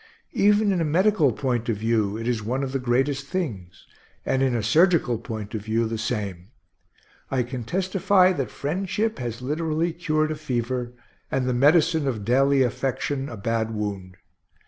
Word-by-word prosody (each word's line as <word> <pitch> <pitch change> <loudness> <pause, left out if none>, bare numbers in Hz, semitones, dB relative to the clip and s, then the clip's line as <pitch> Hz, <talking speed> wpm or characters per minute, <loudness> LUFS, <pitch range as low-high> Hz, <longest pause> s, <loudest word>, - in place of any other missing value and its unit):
Even 205 0 +3
in 180 -3 +1
a - - +2
medical 165 -1 +3
point 120 -1 -2
of 110 - 0
view 110 -1 0
it 115 +1 -5
is 120 -3 0
one 125 +6 -2
of 135 - -3
the 135 - -1
greatest 135 +3 0
things; 115 - -5 0.4
and 130 - +1
in 130 -2 +2
a 115 - -1
surgical 155 - +3
point 110 -4 -6
of 110 - -3
view, 110 +2 0
the 110 0 -3
same. 100 -6 -3 0.8
I 130 -2 +1
can 125 0 -6
testify 185 - +3
that 135 -9 -3
friendship 190 - -2
has 120 -1 -5
literally 160 +4 -1
cured 155 -2 0
a - - -2
fever, 125 -4 -3 0.4
and 130 -1 0
the 125 - 0
medicine 155 +3 +3
of 110 -6 -2
daily 135 +3 +4
affection, 135 +2 -2
a 115 - -7
bad 115 +1 -1
wound. 100 -3 -4
130 Hz, 170 wpm, -24 LUFS, 115-155 Hz, 0.8 s, daily